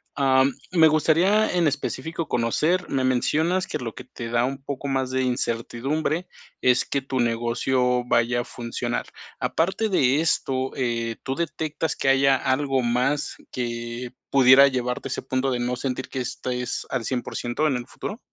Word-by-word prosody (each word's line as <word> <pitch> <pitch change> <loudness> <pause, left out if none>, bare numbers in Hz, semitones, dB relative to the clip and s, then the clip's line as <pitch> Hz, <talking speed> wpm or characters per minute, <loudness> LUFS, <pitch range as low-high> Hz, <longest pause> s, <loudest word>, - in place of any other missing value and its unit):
Am, 135 0 +4 0.2
me 165 -3 +6
gustaría 170 +7 +3
en 170 -3 +3
específico 160 +3 -3
conocer 155 +11 +1
Me 135 -2 0
mencionas 160 +8 +1
que - - -3
lo 115 -3 -5
que 125 - -9
te 120 -2 -8
da 120 0 +2
un 135 +1 -4
poco 140 0 -5
más 135 -1 0
de 130 0 0
incertidumbre 130 +7 -1 0.3
es 125 0 +4
que 140 - -1
tu 130 -1 -3
negocio 125 +2 +1
vaya 120 +1 +2
a - - -5
funcionar. 120 0 -4 0.3
Aparte 190 +7 0
de 140 -7 +3
esto, 130 -5 0
eh, 115 -3 -1
¿tú 135 - -2
detectas 160 -1 -2
que - - -2
haya 135 0 +5
algo 135 0 +1
más 125 +5 0 0.2
que 120 0 -4 0.2
pudiera 135 0 +7
llevarte 125 -2 -2
a - - -7
ese - - -2
punto 130 +1 -1
de 125 - -1
no 125 +1 -1
sentir 130 +1 -3
que 130 - -4
estés 125 0 -3
al 130 -3 -2
cien 125 0 -1
por - - -8
ciento 120 +6 0
en 140 - +1
el 120 +1 -7
futuro? 210 - -6
130 Hz, 175 wpm, -24 LUFS, 125-145 Hz, 0.3 s, pudiera